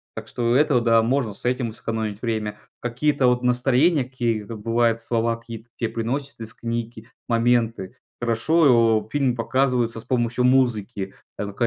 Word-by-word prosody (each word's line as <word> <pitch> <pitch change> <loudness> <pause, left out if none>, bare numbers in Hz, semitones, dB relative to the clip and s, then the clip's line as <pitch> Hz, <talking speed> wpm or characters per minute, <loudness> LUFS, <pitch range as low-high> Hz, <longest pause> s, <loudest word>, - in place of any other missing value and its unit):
Так - - -7
что 120 0 0
это, 145 -4 +3
да, 115 -1 +4
можно 125 -3 0
с - - -15
этим 125 -1 0
сэкономить 110 -2 -4
время. 110 -2 -2 0.2
Какие-то 130 +3 +1
вот 125 0 +2
настроения, 130 +5 +3
какие-то, 115 -4 -3
бывает, 115 +1 +1
слова 115 0 0
какие, 115 -1 -9
такие 115 - -3
произносят 130 +5 -3
из 110 -1 -7
книги, 115 -1 -5 0.2
моменты. 115 -3 +1 0.2
Хорошо, 115 -3 +3
фильм 135 -4 +1
показывается 120 -1 0
с - - -10
помощью 120 0 0
музыки. 120 -6 +1 0.2
Это 100 0 -4
120 Hz, 145 wpm, -23 LUFS, 115-125 Hz, 0.2 s, да